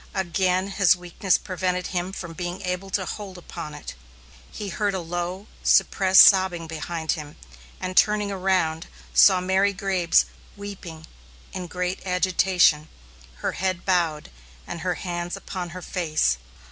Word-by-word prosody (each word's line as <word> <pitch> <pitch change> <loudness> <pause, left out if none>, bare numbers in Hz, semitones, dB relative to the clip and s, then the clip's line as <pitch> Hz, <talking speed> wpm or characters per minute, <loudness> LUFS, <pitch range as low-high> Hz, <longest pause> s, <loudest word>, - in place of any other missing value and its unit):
Again 185 +1 0
his 195 -2 +4
weakness 180 +2 0
prevented 180 -1 -2
him 180 +1 -2
from 170 -3 -7
being 175 +1 -5
able 180 +2 -3
to 190 -1 -1
hold 195 -1 -7
upon 165 -3 -8
it. 150 - -8 0.6
He 210 -2 -6
heard 200 +2 -1
a - - -1
low, 175 +3 -4 0.2
suppressed 190 -1 +5
sobbing 185 -4 +5
behind 160 0 -3
him, 150 -2 -5 0.4
and, 185 0 -4
turning 210 0 +3
around, 180 -4 0 0.3
saw 190 -2 +7
Mary 190 +2 +2
Graves 185 -3 +2 0.3
weeping 185 -6 -8 0.5
and 185 -1 -4
in - - -9
great 180 +1 -3
agitation, 180 -4 +3 0.6
her - - +1
head 185 -2 -2
bowed, 170 - 0 0.3
and 170 - -6
her 180 0 -1
hands 175 -1 -4
upon 180 -2 -6
her 180 +1 -8
face. 155 - 0
180 Hz, 145 wpm, -24 LUFS, 170-190 Hz, 0.6 s, saw